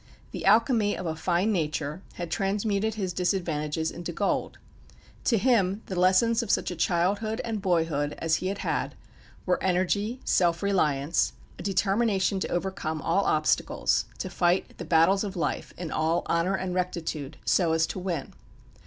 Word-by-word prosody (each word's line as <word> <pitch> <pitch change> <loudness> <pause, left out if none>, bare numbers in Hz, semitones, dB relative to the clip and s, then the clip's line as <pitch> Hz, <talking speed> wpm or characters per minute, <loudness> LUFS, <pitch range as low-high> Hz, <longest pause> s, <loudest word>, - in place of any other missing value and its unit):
The - - -5
alchemy 220 0 +4
of 185 - -5
a 160 -1 -2
fine 175 +5 +1
nature 155 -2 -2
had 175 -2 -5
transmuted 205 +2 0
his 190 -4 -2
disadvantages 160 -4 -1
into 175 0 -6
gold. 200 +4 -1 0.7
To 230 - +3
him 205 -3 +2
the 190 - -5
lessons 205 +6 +4
of 230 - -6
such - - +1
a - - -4
childhood 200 +7 0
and 220 -3 -3
boyhood 165 -6 0
as 165 0 +1
he 185 - -3
had 195 +1 -2
had, - - -1 0.5
were 180 - +1
energy, 195 +6 0
self 170 0 +2
reliance, 150 - +1 0.3
a - - -5
determination 195 +1 +1
to - - -2
overcome 175 -3 -2
all 195 +4 +2
obstacles, 155 0 +1
to 185 - -5
fight 175 +1 +1
the 175 - -5
battles 165 +5 +4
of 205 -1 -5
life, 160 -4 -2
in 170 -3 -5
all 160 +2 0
honour 170 +3 +1
and 190 -1 -3
rectitude, 165 -5 -3
so 170 -4 +3
as 160 0 +3
to 185 - -5
win. 175 -6 -4
180 Hz, 160 wpm, -27 LUFS, 165-200 Hz, 0.7 s, alchemy